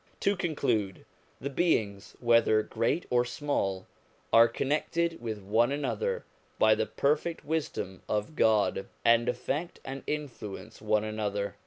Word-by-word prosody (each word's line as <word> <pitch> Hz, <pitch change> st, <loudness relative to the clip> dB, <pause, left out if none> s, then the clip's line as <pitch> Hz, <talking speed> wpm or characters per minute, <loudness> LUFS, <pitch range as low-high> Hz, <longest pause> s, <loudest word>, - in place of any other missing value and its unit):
To 200 Hz, -, +2 dB
conclude: 120 Hz, -, -1 dB, 0.3 s
the 140 Hz, +2 st, -4 dB
beings, 105 Hz, -, 0 dB
whether 115 Hz, -2 st, +4 dB
great 115 Hz, +12 st, -1 dB
or 120 Hz, 0 st, +4 dB
small, 120 Hz, -7 st, -2 dB, 0.5 s
are 115 Hz, +1 st, +8 dB
connected 160 Hz, +6 st, -1 dB
with 110 Hz, -3 st, -4 dB
one 115 Hz, +6 st, +2 dB
another 470 Hz, -, -2 dB, 0.3 s
by -, -, +5 dB
the -, -, 0 dB
perfect 150 Hz, +4 st, 0 dB
wisdom 145 Hz, -, -3 dB
of 105 Hz, +8 st, -1 dB
God, 105 Hz, -5 st, +2 dB, 0.2 s
and 115 Hz, +1 st, +5 dB
affect 140 Hz, +8 st, -3 dB
and 135 Hz, +1 st, -5 dB
influence 130 Hz, -12 st, -5 dB
one 110 Hz, 0 st, +2 dB
another. 105 Hz, -2 st, -2 dB
120 Hz, 130 wpm, -29 LUFS, 105-150 Hz, 0.5 s, are